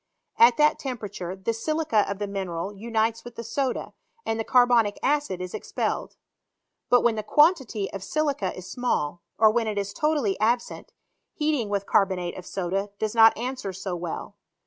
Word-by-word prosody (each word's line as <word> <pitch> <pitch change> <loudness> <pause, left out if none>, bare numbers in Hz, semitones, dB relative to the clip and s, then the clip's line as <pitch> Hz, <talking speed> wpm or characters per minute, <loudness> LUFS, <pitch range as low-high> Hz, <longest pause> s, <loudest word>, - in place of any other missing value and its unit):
At 235 0 +7
that 300 0 +4
temperature 205 -8 -5
the 190 +4 -2
silica 235 -3 0
of 200 - -3
the 205 - -2
mineral 195 -1 -4
unites 225 +2 -1
with 240 -1 -10
the 230 - -6
soda, 255 +3 -2 0.3
and 225 0 -1
the - - 0
carbonic 240 -4 +4
acid 290 -11 +1
is 180 0 -6
ex - - -7
pelled. - - -2 0.7
But 245 - +5
when 235 - +3
the 215 - -3
quantity 265 - +3
of 195 -1 -5
silica 285 -11 -1
is 185 - -8
small, 175 -9 -2 0.2
or 220 -1 +6
when 230 0 0
it 210 -1 -2
is 200 0 -2
totally 290 -8 0
absent, 235 +3 -1 0.4
heating 300 -8 0
with 200 -1 -1
carbonate 185 -4 +1
of 180 - -9
soda 195 +2 -2
does 215 0 -2
not 225 -1 +6
answer 245 -4 -4
so 190 0 -4
well. 170 -1 -6
220 Hz, 175 wpm, -25 LUFS, 195-245 Hz, 0.7 s, At